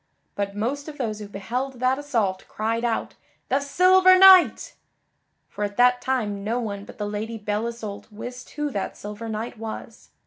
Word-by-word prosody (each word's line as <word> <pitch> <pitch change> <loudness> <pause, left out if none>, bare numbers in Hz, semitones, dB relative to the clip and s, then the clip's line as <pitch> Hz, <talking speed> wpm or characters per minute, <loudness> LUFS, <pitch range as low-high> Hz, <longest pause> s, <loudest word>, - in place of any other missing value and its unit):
But 200 0 -3
most 265 +8 -2
of 300 -1 -8
those 215 -5 -3
who 210 - -7
beheld 235 +7 -4
that 255 +2 +1
assault 225 -10 -1
cried 225 +2 -2
out 235 -2 -1 0.4
"The 270 - +2
Silver 370 +6 +5
Knight!" 380 -1 +7 0.7
For 210 - -5
at 205 0 -4
that 245 0 +4
time 210 -6 -1
no 230 +4 -1
one 205 -4 -5
but - - -13
the 210 - -3
Lady 215 +2 -4
Belle 210 +1 -2
Isoult 225 -3 -7
wist 245 +4 -8
who 295 -1 -2
that 200 -6 -4
silver 210 +2 -7
knight 220 +1 -5
was. 225 -1 -8
230 Hz, 175 wpm, -24 LUFS, 210-265 Hz, 0.7 s, Knight